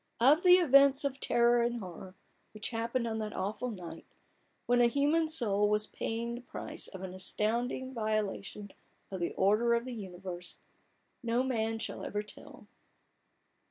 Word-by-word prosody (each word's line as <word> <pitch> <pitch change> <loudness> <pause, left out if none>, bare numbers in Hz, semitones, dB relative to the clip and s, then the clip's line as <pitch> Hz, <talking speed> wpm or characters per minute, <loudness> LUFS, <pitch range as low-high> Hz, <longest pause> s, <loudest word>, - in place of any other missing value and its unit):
Of 280 +8 +5
the 360 -1 +8
events 280 -5 +5
of 275 -1 -2
terror 240 -1 +3
and 235 0 0
horror 185 -1 -9 0.4
which 215 +2 -3
happened 235 +1 -1
on 220 -1 -2
that 215 -1 -4
aweful 215 +6 -3
night, 180 -7 -8 0.6
when 245 0 +3
a 240 - +6
human 295 +6 +2
soul 210 -9 +2
was 210 0 +2
paying 230 +2 -4
the 240 - -6
price - - -5
of 190 -1 -9
an 185 -1 -6
astounding 235 +7 -1
viola 215 -3 -1
tion 200 0 -10 0.4
of 190 - -4
the 170 - -2
order 215 +5 +3
of 235 +1 -1
the 255 - -5
universe, 180 -4 -7 0.6
no 235 +1 +1
man 225 -3 -1
shall 225 - -5
ever 210 0 -3
tell. 210 - -12
230 Hz, 160 wpm, -31 LUFS, 205-250 Hz, 0.6 s, the